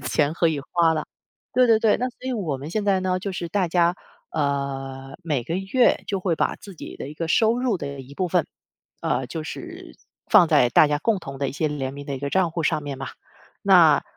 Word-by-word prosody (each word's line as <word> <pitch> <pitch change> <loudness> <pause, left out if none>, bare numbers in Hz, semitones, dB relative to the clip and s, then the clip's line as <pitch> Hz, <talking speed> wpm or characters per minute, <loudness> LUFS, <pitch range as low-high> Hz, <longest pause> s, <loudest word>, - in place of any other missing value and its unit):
钱 150 0 +1
可 170 0 +2
以 150 -3 -1
花 165 -2 +4
了。 155 - -2 0.5
对 255 0 +4
对 225 -2 +5
对， 220 -2 +3
那 250 +2 -1
所 250 - -18
以 260 - -1
我 170 - -2
们 145 +4 -8
现 210 +2 -1
在 195 -2 +3
呢， 185 0 0
就 200 +2 -4
是 175 -2 -4
大 190 -1 0
家， 175 0 +3 0.4
呃， 135 -2 -3
每 150 -7 -1
个 165 - -3
月 200 +7 +2
就 200 - -1
会 180 -2 0
把 - - 0
自 200 -3 -12
己 - - -9
的 - - -6
一 - - -8
个 165 +1 -4
收 225 +6 +3
入 250 -5 +1
的 140 -4 -6
一 135 +2 -12
部 185 - -1
分， 175 -2 +1 0.6
呃， 130 - 0
就 160 +5 -5
是 - - -8 0.4
放 195 -6 +7
在 140 -6 +4
大 155 - +6
家 145 0 0
共 220 +3 +1
同 135 -6 -8
的 140 0 -1
一 - - -9
些 155 +2 -1
联 135 -3 -3
名 140 0 -9
的 140 - -3
一 - - -6
个 140 +1 -4
帐 185 -1 +2
户 165 +1 -3
上 155 -1 0
面 145 -1 -5
嘛。 135 0 -6 0.5
那， - - +6
160 Hz, 260 characters per minute, -23 LUFS, 140-190 Hz, 0.6 s, 放